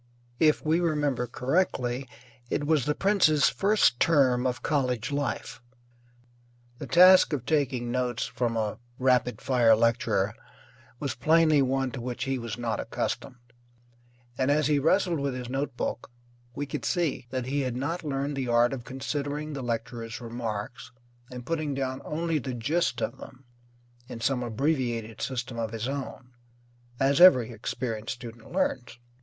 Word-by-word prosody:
If 155 -1 +3
we 160 +2 +3
remember 145 -7 0
correctly, 125 -2 -1 0.4
it 145 - -1
was 150 -4 +2
the 150 - 0
prince's 180 -8 +3
first 200 - +2
term 130 -6 +3
of 125 -1 -3
college 125 -4 0
life. 140 -3 -3 1.2
The - - -6
task 185 -1 +7
of 130 -5 -2
taking 130 -5 0
notes 125 -1 -1
from 115 -2 -2
a 110 -2 -2 0.2
rapid 125 -3 +2
fire 120 -4 +4
lecturer 115 -3 +1 0.7
was 140 -5 -2
plainly 155 +3 +4
one 135 0 0
to 130 - -6
which 125 +1 -4
he 135 -1 -1
was 115 -2 -5
not 115 -2 -2
accustomed, 120 0 -5 0.9
and 130 +1 +2
as 150 +1 +3
he 150 -1 +3
wrestled 170 +2 +2
with 140 -2 -2
his 125 -1 -6
notebook 135 -2 -3 0.5
we 145 - -3
could 140 - -5
see 160 -8 -1
that 130 -1 -3
he 140 +2 -1
had 130 -3 -2
not 165 +8 -3
learned 140 -1 -2
the 135 -2 -2
art 120 +1 +3
of 125 -3 -5
considering 145 +4 -4
the 140 - -4
lecturer's 115 -1 -4
remarks 115 0 -5 0.4
and 125 -1 -8
putting 155 -2 -2
down 130 -1 -3
only 165 0 -1
the 130 -1 -5
gist 150 +9 0
of - - -4
them, 130 0 -12 0.6
in 120 - -8
some 125 +2 0
abbreviated 120 -2 -2
system 125 -2 -3
of 115 -1 -2
his 115 +1 -3
own, 130 -2 -6 0.7
as 140 +4 +3
every 130 -11 +7
experienced 115 +1 -4
student 115 -1 -11
learns. 135 -10 -1
130 Hz, 150 wpm, -27 LUFS, 120-145 Hz, 1.2 s, task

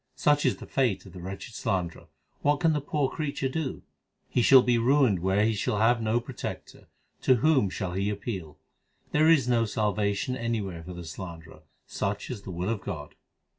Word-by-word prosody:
Such 145 0 +3
is - - +1
the - - -9
fate 125 -9 0
of 95 - -13
the 90 - -9
wretched 95 +5 -7
slanderer: 85 -5 -2 0.3
what 145 0 +2
can 165 -2 +3
the 150 - 0
poor 145 0 0
creature 140 -2 -2
do? 135 +1 -3 0.4
He 125 - +1
shall 130 +1 +7
be 120 -1 +2
ruined 125 -5 +3
where 95 +4 +2
he 115 - +2
shall 105 0 -1
have 115 +2 +3
no 110 +2 +1
protector: 120 -1 -7 0.3
to 130 - +5
whom 130 -4 +3
shall 90 -1 -4
he 100 +2 0
appeal? 100 -7 -5 0.5
There 155 +2 +4
is 145 -7 +5
no 120 -2 +3
salvation 105 +2 0
anywhere 110 -8 -3
for 90 +2 -8
the 85 -1 -8
slanderer: 80 -1 -9 0.2
such 100 +5 -3
is 115 -5 -5
the 100 - -10
will 90 +2 -3
of 115 -4 -2
God. 75 -7 -6
110 Hz, 190 wpm, -27 LUFS, 95-130 Hz, 0.5 s, shall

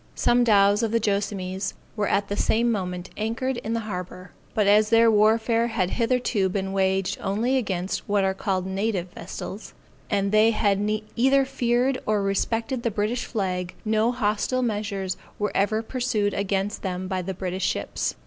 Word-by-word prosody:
Some 245 0 +3
dows 205 -2 +4
of 225 - +1
the 230 - +2
Joassamees 200 -2 -2 0.2
were 210 -2 0
at 200 0 +1
the 205 - -2
same 235 +3 +2
moment 180 -3 -3
anchored 230 +4 -2
in 225 -1 -3
the 230 - -1
harbor; 185 -3 -6 0.2
but 210 - +3
as 210 +1 +5
their 230 0 +5
warfare 225 +2 +3
had 190 -6 -1
hitherto 235 -5 +1
been 190 0 -2
waged 190 -1 +1
only 225 +7 0
against 190 -8 -2
what 205 -1 +2
are 190 0 +1
called 190 -1 -2
native 190 -2 -2
vessels, 190 +4 -8 0.3
and 200 -2 +1
they 215 +1 +5
had 205 -2 +1 0.3
either 270 +3 +4
feared 255 0 +1
or 210 -2 +2
respected 225 +5 -1
the 235 - 0
British 215 +3 -1
flag, 185 -5 -3
no 220 +2 +2
hostile 245 +2 0
measures 205 -4 -2 0.2
were 210 0 -1
ever 215 +3 +1
pursued 225 -4 -1
against 200 +1 -1
them 185 -1 -3
by 185 -1 -2
the 190 +1 -5
British 185 0 -2
ships. - - -2
205 Hz, 170 wpm, -25 LUFS, 190-230 Hz, 0.3 s, as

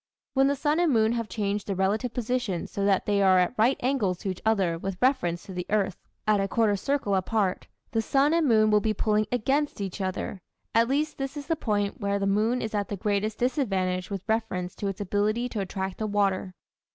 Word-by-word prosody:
When 270 0 +4
the 280 - +2
sun 295 +3 +1
and 345 -3 +3
moon 220 -2 +3
have 230 -2 -2
changed 205 +1 -2
their 200 - -1
relative 205 +6 0
positions 245 -6 -2
so 200 - -2
that 195 -2 +2
they 205 -1 +2
are 190 -1 +5
at 180 +3 +2
right 235 +4 +3
angles 240 -9 +1
to 195 - -3
each 185 - -8
other 195 -6 +2
with 195 +1 -4
reference 250 -10 +1
to 190 - -9
the 180 0 -4
earth 200 -3 0 0.3
at 215 -1 +3
a 195 - +1
quarter 215 0 +2
circle 260 0 -1
apart 190 0 0 0.2
the 225 - +1
sun 275 +6 +2
and 335 -3 +3
moon 215 -3 +4
will 210 - +5
be 215 +1 0
pulling 215 +1 +1
against 270 +4 0
each 195 0 -4
other; 190 0 -3 0.3
at 230 +1 +4
least 295 +4 -1
this 275 +2 -4
is 285 - -6
the 330 - 0
point 210 -4 -1
where 200 0 0
the 200 - -1
moon 215 +5 +1
is 220 - -4
at 205 -1 -1
the 205 - -4
greatest 210 +1 -1
disadvantage 195 - 0
with 200 -2 -4
reference 220 -5 -1
to 200 - -3
its 195 0 -4
ability 210 +4 0
to 225 - -4
attract 190 0 -4
the 215 - -1
water. 195 -2 0
210 Hz, 225 wpm, -27 LUFS, 195-245 Hz, 0.3 s, are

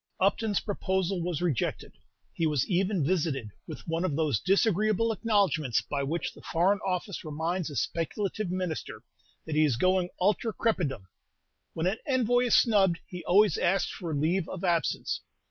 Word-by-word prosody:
Upton's 205 +2 +1
proposal 190 -2 -1
was 175 -1 -2
rejected. 155 -9 -1 0.4
He 165 - 0
was 150 -4 0
even 185 -3 +1
visited 145 - -1 0.2
with - - -9
one 165 +1 -1
of 160 -6 0
those 150 -9 +1
disagreeable 215 +2 +2
acknowledgments 200 - +1
by 140 -1 -3
which 155 +5 -2
the - - -15
Foreign 190 +5 +1
Office 190 -1 -3
reminds 165 +3 -2
a 145 - -8
speculative 195 - -2
minister 180 -3 -4 0.4
that 160 - -4
he 155 +1 +4
is 140 -7 +2
going 185 +3 +2
ultra 210 +4 +1
crepidam. 170 - -1 0.7
When 160 - -1
an 195 +4 0
envoy 245 -2 +2
is 240 - +4
snubbed, 195 -7 +4
he 180 -1 -8
always 200 -1 +4
asks 180 -1 +1
for 165 -4 -4
leave 165 +5 0
of 185 - -6
absence. 170 -5 0
180 Hz, 160 wpm, -28 LUFS, 160-200 Hz, 0.7 s, he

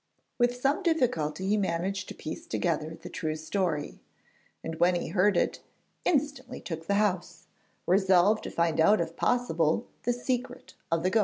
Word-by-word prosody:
With 245 0 +3
some 275 +8 +1
difficulty 190 - 0
he 210 +2 +3
managed 190 0 -1
to - - -8
piece 155 - -7
together 160 -1 -1
the - - -9
true 155 -1 -3
story, 160 -1 -2 0.6
and 160 0 -5
when 175 +1 +4
he 175 - -2
heard 195 0 +3
it, - - +1 0.5
instantly 275 -5 0
took 165 -1 -6
the 200 - +2
house, 185 -5 0 0.4
resolved 190 +2 +4
to - - -3
find 170 -2 0
out 205 +6 +5
if 165 0 -2
possible 195 -7 +1 0.2
the 245 - +1
secret 250 +1 -3 0.2
of 165 0 +1
the 185 - +2
ghost. 225 - +4
190 Hz, 165 wpm, -28 LUFS, 165-240 Hz, 0.6 s, out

